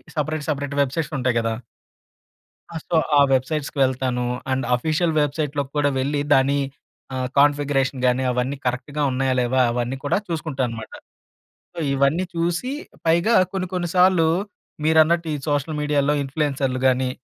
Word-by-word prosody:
Separate, 155 0 -2
separate 145 -1 -2
websites 150 +3 -2
ఉంటాయి 125 -2 +1
గదా! 115 -1 -1 1.2
ఆ! - - -8
సో, 175 - -1 0.2
ఆ - - +7
వెబ్‌సైట్స్‌కి 145 +3 -1
వెళ్తాను. 130 -1 0 0.3
అండ్ 130 -1 0
ఆఫీషియల్ 155 +5 0
వెబ్‌సైట్‌లోకి 145 -1 -2
కూడా 145 -1 +3
వెళ్లి 145 +2 0
దాని 135 +2 +3 0.6
ఆహ్, 130 -1 -1
కాన్ఫిగరేషన్ 145 -2 +2
గానీ, 125 +1 +2
అవన్నీ 125 +3 -1
కరెక్ట్‌గా 130 +4 -2
ఉన్నాయా 130 0 0
లేవా? 125 +1 +1
అవన్నీ 120 +2 -2
కూడా 145 - +1
చూసుకుంటా 155 -5 -3
అనమాట. 115 -2 -8 0.8
సో, - - -7
ఇవన్నీ 140 +6 +2
చూసి 175 +10 -1 0.3
పైగా 170 +8 +3 0.2
కొన్ని, 185 -1 -2
కొన్ని 175 -2 -1
సార్లు 180 -2 +5 0.6
మీరన్నట్టు 160 +1 +4
ఈ - - -1
సోషల్ 145 +2 -1
మీడియాలో 145 -1 +1
ఇన్ఫ్లూయెన్సర్‌లు 135 -2 -1
గానీ, 130 0 +2
145 Hz, 140 wpm, -22 LUFS, 130-155 Hz, 1.2 s, ఆ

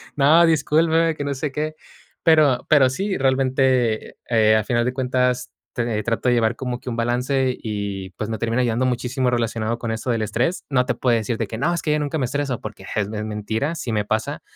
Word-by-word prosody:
"No, 155 +4 +6
discúlpeme", 160 +1 +2
que 145 - -4
no 140 0 -2
sé 140 +2 -3
qué. 155 +2 -3 0.5
Pero 155 -6 +4
pero 140 -4 +6
sí, 190 +9 -2
realmente, 130 -3 +1
eh, 110 -2 +4
a 110 - 0
final 120 -1 +1
de 125 - 0
cuentas, 125 -1 0 0.2
t 115 -4 -1
trato 115 +2 -1
de 120 - +3
llevar 115 0 +1
como 125 -2 -4
que - - -6
un 115 - -4
balance 125 +2 0
y 100 -3 -4
pues 105 - -3
me 110 - -2
termina 115 +3 0
ayudando 120 +1 +1
muchísimo 125 +1 0
relacionado 115 -1 -1
con 115 -1 -3
eso 120 +3 -2
del 115 -2 0
estrés. 120 - -1
No 125 -3 +2
te - - 0
puedo 120 -2 +2
decir 115 +1 -1
de 115 - -2
que 110 - -6
no 165 +8 +1
es 170 - -2
que 150 - +1
yo 150 - +1
nunca 150 +1 -2
me 135 - 0
estreso 135 -1 -2
porque 105 -3 -8
es 100 -2 +1
men 110 0 -4
mentira, 110 +9 -2
sí 130 -7 -4
me 105 - +1
pasa. 110 +7 -2
125 Hz, 225 wpm, -22 LUFS, 115-140 Hz, 0.5 s, No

